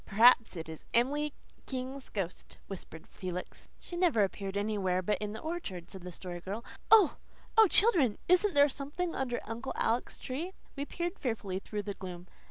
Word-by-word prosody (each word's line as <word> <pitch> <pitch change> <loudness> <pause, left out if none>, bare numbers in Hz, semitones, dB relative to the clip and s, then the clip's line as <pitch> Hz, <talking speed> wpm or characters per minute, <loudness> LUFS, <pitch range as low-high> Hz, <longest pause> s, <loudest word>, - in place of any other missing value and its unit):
"Perhaps 230 +1 +6
it 165 -2 -5
is 160 -1 -8
Emily 290 +5 +2 0.4
King's 260 +1 -4
ghost," 190 -4 -4
whispered 175 -4 -8
Felix. 180 -1 -7
"She 350 - -8
never 345 - +4
appeared 195 0 -2
anywhere 200 -3 0
but 210 +3 +1
in 210 0 -3
the 220 - -6
orchard," 310 - -5
said 190 - -8
the 180 +1 -7
Story 175 0 -7
Girl. 200 +6 -5 0.2
"Oh, 425 -8 +7 0.4
oh, 445 -1 +8
children, 340 - +5
isn't 365 0 +4
there 285 0 +7
something 295 +5 -3
under 250 -2 -1
Uncle 235 +4 -4
Alec's 230 +2 0
tree?" 320 +9 -4 0.2
We 280 0 -3
peered 345 +4 -3
fearfully 210 -7 -2
through 210 +1 -4
the 200 - -3
gloom. 180 -2 -7
230 Hz, 175 wpm, -32 LUFS, 195-290 Hz, 0.4 s, oh